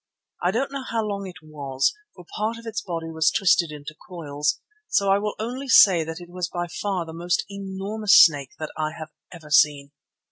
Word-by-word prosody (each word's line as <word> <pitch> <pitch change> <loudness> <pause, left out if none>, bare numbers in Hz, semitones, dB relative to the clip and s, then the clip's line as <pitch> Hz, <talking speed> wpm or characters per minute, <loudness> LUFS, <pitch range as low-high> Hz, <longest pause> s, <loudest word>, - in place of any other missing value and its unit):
I 175 - +2
don't 255 +8 -1
know 275 -1 -4
how 230 -3 -2
long 200 -2 -4
it 175 -4 -12
was, 140 -3 -1 0.2
for 180 - -13
part 220 +2 -2
of 230 - -12
its 225 0 -4
body 165 -4 -5
was 160 -1 +2
twisted 170 -2 +3
into 150 0 -9 0.2
coils, 150 -3 -2 0.3
so 200 -1 +2
I 195 - +4
will 210 0 -3
only 250 +5 -5
say 185 -9 +7
that 160 +1 -6
it 175 - -11
was 180 -1 -3
by 175 -1 -3
far 185 0 -3
the 160 - -9
most 175 +2 -1
enormous 200 +2 +2
snake 145 -5 +5
that 155 - -6
I 155 0 -2
have 155 0 -8 0.2
ever 155 -4 -12
seen. 145 -2 +3
175 Hz, 205 wpm, -24 LUFS, 155-200 Hz, 0.3 s, say